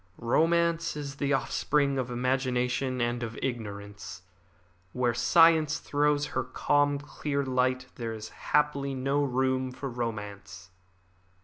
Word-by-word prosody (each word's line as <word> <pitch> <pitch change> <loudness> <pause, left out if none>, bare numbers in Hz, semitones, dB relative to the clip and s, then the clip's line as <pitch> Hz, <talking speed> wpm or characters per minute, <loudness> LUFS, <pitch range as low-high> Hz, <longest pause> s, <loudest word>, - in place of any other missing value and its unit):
"Romance 165 +6 +1
is 140 -1 -6
the 140 0 -1
offspring 140 0 +1
of 125 -1 -2
imagination 125 +1 0
and 120 0 0
of 115 -1 -5
ignorance. 100 -5 -6 0.7
Where 125 -1 +1
science 160 +2 +5
throws 145 0 +1
her 130 - 0
calm, 145 +3 +1
clear 140 0 -3
light 130 0 +1
there 115 -2 -3
is 110 0 -8
happily 140 -2 0
no 135 +2 0
room 130 -1 0
for 135 +2 -6
romance." 100 -5 -6
130 Hz, 120 wpm, -28 LUFS, 120-145 Hz, 0.7 s, science